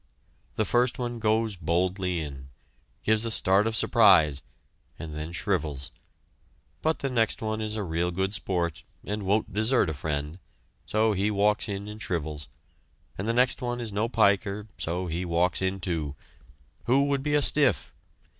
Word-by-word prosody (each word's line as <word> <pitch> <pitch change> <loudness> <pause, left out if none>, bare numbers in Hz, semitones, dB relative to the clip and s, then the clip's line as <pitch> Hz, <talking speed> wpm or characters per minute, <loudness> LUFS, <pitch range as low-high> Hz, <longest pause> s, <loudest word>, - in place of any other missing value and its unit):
The 110 - +1
first 120 +4 +2
one 120 -1 -3
goes 110 -1 +1
boldly 90 +1 0
in, 70 -3 -8 0.5
gives 110 0 +4
a 115 - +1
start 100 -1 +3
of 110 - -1
surprise, 90 -13 +5 0.6
and 80 -2 -7
then 75 +2 -5
shrivels, 80 -6 -2 0.9
but 160 0 +1
the 135 - -2
next 115 -3 +1
one 110 0 -2
is 110 0 -2
a 105 - -2
real 85 0 -1
good 95 +3 -1
sport, 90 -6 -2 0.2
and 105 +1 -3
won't 100 +2 0
desert 110 -4 +2
a - - -4
friend, 75 +3 -4 0.5
so 110 0 +2
he 100 +2 0
walks 105 +1 +1
in 100 0 -4
and 105 +1 -8
shrivels, 75 -5 -3 0.7
and 100 - -4
the 115 - +1
next 125 +2 +3
one 120 0 -2
is 115 -4 -4
no 110 +3 0
piker, 100 -2 +2
so 90 +3 -2 0.2
walks 85 +3 +1
in, 95 +1 -1
too. 80 -6 -3 0.7
Who 135 +3 +3
would 140 -1 0
be 145 +1 0
a 145 - +4
stiff? 130 - +2
100 Hz, 165 wpm, -27 LUFS, 85-110 Hz, 0.9 s, surprise